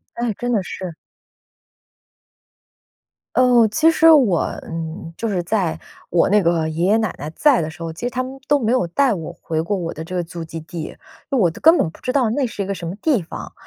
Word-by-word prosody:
哎， 235 -2 -1
真 245 +4 -3
的 210 -4 +2
是。 185 -1 -6 2.4
哦， 245 -2 +5
其 310 +10 +3
实 325 0 +6
我， 245 - +5 0.2
嗯， 165 0 -6
就 230 - -2
是 195 -4 0
在 175 -5 0 0.3
我 170 - +3
那 205 0 +4
个 165 -2 +1
爷 165 +3 -1
爷 210 +3 +4
奶 220 -6 -1
奶 150 +2 -6
在 290 - +4
的 155 - -3
时 160 +1 -15
候， 165 -1 -4
其 165 - -9
实 245 - 0
他 255 0 -2
们 270 +1 -9
都 290 - +4
没 230 -3 0
有 250 -9 +1
带 255 +6 +2
我 170 -2 -6
回 160 -1 -2
过 205 +5 -1
我 170 -3 -4
的 160 - -6
这 180 +3 -6
个 175 - -1
祖 170 0 -7
籍 165 0 -7
地， 165 +2 -9
因 - - -6 0.4
为 270 - +1
我 185 - +4
都 165 - -8
根 325 +1 +6
本 165 - +1
不 - - -18
知 255 - -2
道 260 -4 +2
那 270 +5 0
是 225 -4 -5
一 - - -7
个 200 - -2
什 170 -3 -6
么 185 - -5
地 245 - +1
方， 165 - -8
195 Hz, 255 characters per minute, -20 LUFS, 165-245 Hz, 2.4 s, 实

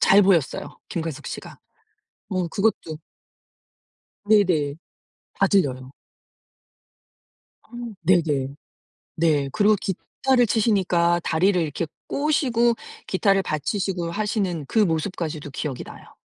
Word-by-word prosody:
잘 200 +1 +6
보였어요 180 -7 +1
김광석 160 -3 -4
씨가. - - -7 0.7
뭐 185 -3 -1
그것도 195 -5 -1 1.3
네네. 185 -9 +3 0.6
다 195 - +4
들려요. 130 -10 +1 1.7
어. - - -29 0.3
네네. 150 -6 +2 0.6
네. 150 -4 +2
그리고 210 0 +4
기타를 245 +6 0
치시니까 185 -6 +2
다리를 180 +3 +2
이렇게 160 +1 -2 0.2
꼬시고 255 -5 +2 0.3
기타를 195 0 +2
받치시고 175 +3 -2
하시는 200 -5 -1
그 - - 0
모습까지도 160 -4 -1
기억이 135 -1 -4
나요. - - -13
180 Hz, 235 characters per minute, -23 LUFS, 155-205 Hz, 1.7 s, 잘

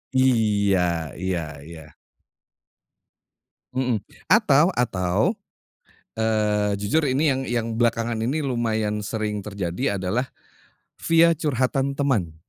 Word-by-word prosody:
Iya 100 - +2
iya 95 -2 -1 0.2
iya. 80 0 -11 1.9
Mhm, 125 -4 0 0.3
atau 180 -6 +5
atau, 90 - -1 1.0
eee, 105 -2 +1
jujur 105 +11 +1
ini 140 +3 +1
yang 135 -2 +1
yang 120 -3 -2
belakangan 115 0 0
ini 135 +7 0
lumayan 110 -6 -1
sering 105 -1 -3
terjadi 100 +2 -2
adalah 110 +8 -1 0.7
via 165 0 +4
curhatan 135 -2 0
teman. 125 - 0
115 Hz, 95 wpm, -23 LUFS, 100-130 Hz, 1.9 s, atau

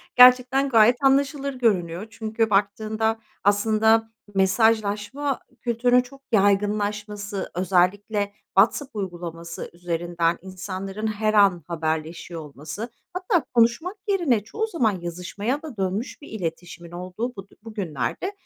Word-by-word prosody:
gerçekten 255 +2 +7
gayet 240 +3 +5
anlaşılır 275 +1 +2
görünüyor. 200 -5 0
Çünkü 225 0 -1
baktığında 215 +2 +1 0.2
aslında 220 +2 +3 0.2
mesajlaşma 220 +6 +1 0.2
kültürünün 245 +1 +3
çok 270 +2 -14
yaygınlaşması, 205 0 0
özellikle 200 +3 +1 0.2
WhatsApp 235 +5 +3
uygulaması 170 -3 -6
üzerinden 170 -1 -1
insanların 190 +3 -5
her 215 0 0
an 195 -6 +4
haberleşiyor 160 0 -3
olması, 150 - -7 0.2
hatta 365 -2 +1
konuşmak 240 - +2
yerine 310 - +2
çoğu 440 - -3
zaman 225 - 0
yazışmaya 180 - -3
da 295 -9 -9
dönmüş 195 +9 -2
bir - - -11
iletişimin 175 -3 -6
olduğu 185 +8 -5
bud 195 0 -10
bugünlerde, 205 - -3
210 Hz, 105 wpm, -24 LUFS, 185-240 Hz, 0.2 s, gerçekten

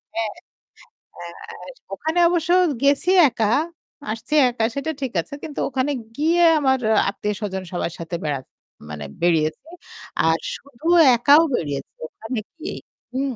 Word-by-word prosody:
হ্যাঁ। 225 -2 -1 0.8
আস 175 - -10 0.2
ওখানে 320 +3 -1
অবশ্য 345 -1 -1 0.3
গেছি 280 +5 +3 0.2
একা, 220 -2 0 0.6
আসছি 225 +7 -6 0.2
একা, 235 -2 -3
সেটা 300 +3 -2
ঠিক 265 - -2
আছে। - - -14
কিন্তু 295 - -6
ওখানে 265 +2 -1 0.3
গিয়ে 335 +3 +3 0.2
আমার 265 -2 +2 0.3
আত্মীয়-স্বজন 200 -2 -4
সবার 175 -1 -2
সাথে 170 +1 -5
বেরাত 140 -3 -2 0.5
মানে 75 -1 -6 0.2
বেড়িয়েছি। 160 - +1 0.6
আর 165 0 +3 0.2
শুধু 280 +2 -18 0.3
একাও 290 +6 +6
বেড়িয়েছি 140 -3 -4 0.2
ওখানে 225 +6 -6 0.2
গিয়ে 320 - -6 0.4
হুম। 265 -1 -2
235 Hz, 125 wpm, -22 LUFS, 175-290 Hz, 0.8 s, একাও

